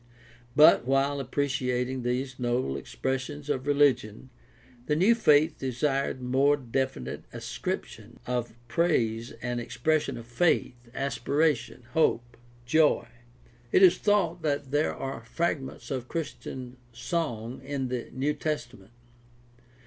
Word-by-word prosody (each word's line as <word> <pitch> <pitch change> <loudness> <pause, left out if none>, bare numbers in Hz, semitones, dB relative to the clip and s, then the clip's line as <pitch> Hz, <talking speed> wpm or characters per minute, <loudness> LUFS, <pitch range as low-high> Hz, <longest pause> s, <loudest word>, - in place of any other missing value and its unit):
But 150 -5 +7
while 135 +1 +2
appreciating 130 -2 -1
these 125 +2 -2
noble 120 - 0
expressions 135 - -3
of 130 -1 -2
religion, 135 -5 +2 0.6
the 150 - +2
new 190 +9 +5
faith 155 -8 +4
desired 135 0 -1
more 135 +3 +3
definite 130 - -3
ascriptions - - -5
of 120 -2 -2
praise 115 -6 +1
and 120 0 -2
expression 140 +2 0
of 115 - -9
faith, 120 -2 0
aspiration, 140 0 0
hope, 120 -6 +1 0.3
joy. 155 +4 +3 0.7
It 195 - +5
is 180 -1 +7
thought 180 -5 +2
that 145 -3 -1
there 150 +2 +1
are 135 -3 -5
fragments 135 +1 -3
of 130 -2 -3
Christian 130 -5 -6
song 120 -3 -3
in 135 -2 -3
the 125 -2 -4
New 140 +3 0
Testament. 120 -9 -5
135 Hz, 115 wpm, -28 LUFS, 120-150 Hz, 0.7 s, But